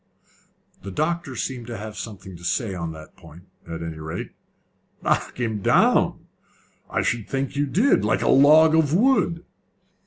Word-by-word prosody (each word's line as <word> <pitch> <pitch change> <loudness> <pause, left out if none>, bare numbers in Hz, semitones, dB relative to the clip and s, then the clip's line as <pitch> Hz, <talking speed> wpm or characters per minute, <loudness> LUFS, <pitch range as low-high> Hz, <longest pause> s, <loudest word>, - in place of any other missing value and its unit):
The 100 - -7
doctor 155 - -2
seemed 125 -3 -4
to 120 -2 -6
have 105 +1 -8
something 95 -5 -8
to 85 - -13
say 95 +4 -1
on 85 -3 -4
that 80 -1 -13
point, 85 +4 -15 0.2
at 85 0 -6
any 80 -1 -6
rate. 80 +1 -6 0.7
"Knock - - -1
him 110 -4 -2
down! - - +3 0.6
I - - -1
should 115 -2 -2
think 135 0 -2
you 145 +1 0
did! 215 - +2
Like 105 0 +1
a - - 0
log 155 +4 +6
of 160 -1 +3
wood!" 200 -7 +2
115 Hz, 160 wpm, -23 LUFS, 95-150 Hz, 0.7 s, log